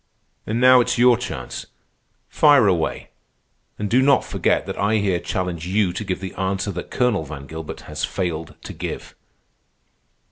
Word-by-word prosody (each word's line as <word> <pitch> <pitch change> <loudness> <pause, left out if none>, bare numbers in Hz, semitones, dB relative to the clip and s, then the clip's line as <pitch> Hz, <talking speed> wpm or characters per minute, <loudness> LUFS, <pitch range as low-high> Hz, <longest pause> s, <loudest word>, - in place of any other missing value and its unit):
"And 110 +2 -1
now 125 0 +7
it's 120 - -1
your 125 0 +6
chance. 90 - -6 0.6
Fire 145 -6 +5
away, 90 -5 0 0.7
and 105 - -2
do 125 +5 +3
not 140 0 +4
forget - - 0
that - - -6
I 105 +2 +2
here 100 -4 +1
challenge 90 -3 -3
you 95 -1 +1
to 90 - -4
give 95 -2 -3
the 95 - -6
answer 95 +1 -2
that 90 -1 -6
Colonel 125 -9 +1
Van 75 -2 -8
Gilbert 80 +2 -7
has 75 0 -6
failed 85 -4 -3
to - - -7
give." - - -6
95 Hz, 165 wpm, -22 LUFS, 85-120 Hz, 0.7 s, now